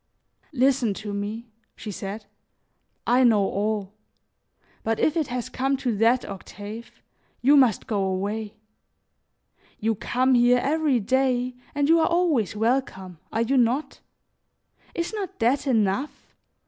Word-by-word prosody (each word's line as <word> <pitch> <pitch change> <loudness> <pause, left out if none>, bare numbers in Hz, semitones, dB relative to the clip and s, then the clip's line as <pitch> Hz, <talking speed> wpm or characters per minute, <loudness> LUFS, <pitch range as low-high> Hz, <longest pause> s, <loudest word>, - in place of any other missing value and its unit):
"Listen 255 -6 +2
to 205 0 -6
me," 215 +3 -5 0.2
she 215 - -7
said; 205 +2 -6 0.8
"I 250 +2 +4
know 220 -5 +4
all; 205 0 -2 0.9
but 225 0 -1
if 310 - +2
it 315 -4 0
has 245 -2 -4
come 270 +1 -1
to 250 -4 -1
that, 235 +4 +3
Octave, 205 +3 -9 0.4
you 280 +4 +6
must 255 -7 +4
go 205 -3 -1
away. 205 +3 -3 1.2
You 225 +1 +1
come 255 +5 +1
here 245 0 +5
every 290 0 +1
day 255 +2 +1 0.2
and 285 -1 +1
you 330 +1 +5
are 320 - +3
always 325 - +1
welcome, 210 - -1
are 225 - +1
you 265 +4 +1
not? 250 +5 +1 1.0
Is 340 +4 -3
not 400 -5 -5
that 255 +5 +1
enough? 230 +3 -1
240 Hz, 135 wpm, -24 LUFS, 210-270 Hz, 1.2 s, you